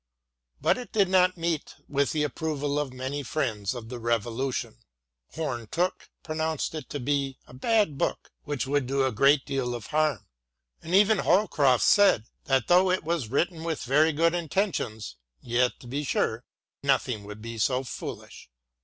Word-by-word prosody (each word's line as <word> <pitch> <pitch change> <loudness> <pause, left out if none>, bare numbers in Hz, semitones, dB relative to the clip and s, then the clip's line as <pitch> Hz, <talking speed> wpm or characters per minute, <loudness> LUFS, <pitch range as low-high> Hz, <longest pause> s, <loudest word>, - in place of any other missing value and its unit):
But - - +2
it 250 - -9
did 200 -4 +2
not 185 -1 +4
meet 165 -2 -2
with 140 -1 +1
the 150 -1 0
approval 150 -1 -2
of 145 -3 -2
many 130 +3 -4
friends 120 -7 -2
of 115 -2 -8
the 125 -1 -6
Revolution. 120 - -2 0.6
Home 130 -8 -3
Tooke 180 +8 -2
pronounced 160 -1 -2
it 155 -4 -7
to 145 - -4
be 135 0 -1
" - - -36
a - - -16
bad 160 - +1
book - - -2
which 145 -5 -2
would 140 -1 0
do 135 0 +1
a 130 - +1
great 135 +5 +4
deal 125 -3 -2
of 120 - -7
harm," 155 -6 +1 0.6
and 170 +3 -1
even 210 +1 +5
Holcroft 155 - +3
said 200 - +5
" - - -48
that 135 -2 +2
though 180 +2 +5
it 185 +1 +1
was 160 -8 -2
written 160 +5 0
with 165 -2 -3
very 150 +5 +4
good 165 +2 +2
intentions, 160 - -2 0.2
yet, 120 - 0
to - - -13
be 140 +5 -3
sure, 120 -4 -1 0.4
nothing 130 -5 +1
could 105 0 -8
be 115 -1 -6
so 130 +4 +1
foolish." 120 - -8
140 Hz, 175 wpm, -27 LUFS, 125-165 Hz, 0.6 s, even